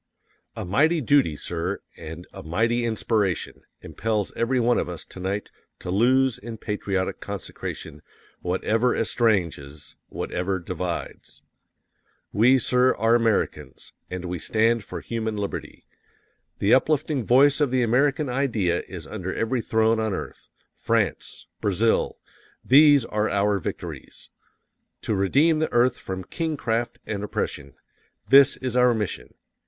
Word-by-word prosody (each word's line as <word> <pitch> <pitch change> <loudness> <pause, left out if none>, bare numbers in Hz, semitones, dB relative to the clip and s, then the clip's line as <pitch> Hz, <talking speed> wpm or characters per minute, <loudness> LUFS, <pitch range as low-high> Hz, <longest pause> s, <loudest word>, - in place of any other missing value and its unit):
_A - - -5
MIGHTY 155 - +3
DUTY, 135 - +3
SIR, 85 +3 -3 0.2
AND 80 +2 -9
A - - -8
MIGHTY 115 +9 0
INSPIRATION 110 -5 -1 0.2
impels 105 -2 -2
every 125 +2 +1
one 120 0 +2
of - - -3
us 85 -2 -7
to - - -12
night 95 +3 -3 0.3
to 90 - -6
lose 130 +5 +3
in 115 +1 -8
patriotic 100 -3 -2
consecration 75 -1 -7 0.4
WHATEVER 110 +7 +1
ESTRANGES, 85 - -1
WHATEVER 95 +2 -3
DIVIDES._ 90 0 -5 0.9
WE, 120 +6 +5
SIR, 125 +1 +2
are 115 +1 +2
Americans 115 -3 -1 0.2
AND 90 -1 -5
WE 90 0 -4
STAND 115 +3 +1
FOR - - -7
HUMAN 110 -2 -3
LIBERTY! 100 -1 -5 0.7
The 100 - +2
uplifting 145 -1 +2
force 140 +6 +4
of 145 - +3
the 130 0 +1
American 140 +5 +2
idea 115 -10 0
is 85 -4 -8
under 95 -1 -5
every 120 +2 -1
throne 110 0 +2
on 110 -2 -1
earth. - - -8 0.3
_France, - - -1 0.2
Brazil 105 +3 +1 0.5
THESE 145 -1 +6
ARE 105 0 -1
OUR 100 0 +1
VICTORIES. - - -7 0.7
To - - -1
redeem 140 - +3
the 160 - -1
earth 120 +1 +3
from 95 -1 -5
kingcraft 120 - -2
and 100 -2 -4
oppression 70 -8 -4 0.5
THIS 140 +1 +7
IS 130 -2 -4
OUR 125 -1 +4
MISSION! 105 -3 -4
110 Hz, 130 wpm, -24 LUFS, 95-125 Hz, 0.9 s, THIS